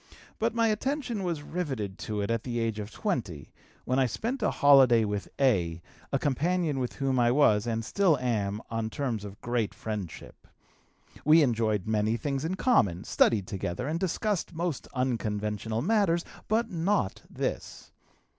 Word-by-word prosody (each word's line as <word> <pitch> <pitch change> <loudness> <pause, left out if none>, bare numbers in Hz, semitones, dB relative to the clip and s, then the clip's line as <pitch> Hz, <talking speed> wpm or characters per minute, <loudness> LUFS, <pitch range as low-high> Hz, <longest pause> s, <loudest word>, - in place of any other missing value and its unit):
But 230 +1 0
my 230 -1 +3
attention 245 0 -1
was 170 -5 -2
riveted 135 - -4
to 105 -1 -3
it 100 - -1
at 115 -1 0
the 120 -2 -3
age 115 -2 -1
of 105 0 -5
20, 115 - -3 0.3
when 130 +2 +1
I 130 - +3
spent 240 - -3
a 210 - +2
holiday 130 -5 +6
with 105 -1 -3
A., 90 -12 +2 0.3
a - - +2
companion 155 +1 0
with 125 -1 -2
whom 135 -2 0
I 120 -1 +4
was, 120 -5 +4
and 115 -1 -1
still 185 - +3
am, 105 -4 -1
on 115 -1 -2
terms 115 -4 -3
of 100 0 -9
great 120 -3 -1
friendship. 105 -7 -7 0.8
We 155 +1 +6
enjoyed 110 -6 +1
many 110 +1 +1
things 135 +3 -2
in 170 +4 -1
common, 105 - +2
studied 105 -5 +2
together 95 +5 -4
and 160 +3 -1
discussed 190 0 -1
most 165 -4 -3
unconventional 110 -3 -1
matters, 190 -4 +2 0.2
but 225 +1 +1
not 175 - 0
this. - - -4
125 Hz, 160 wpm, -28 LUFS, 110-170 Hz, 0.8 s, holiday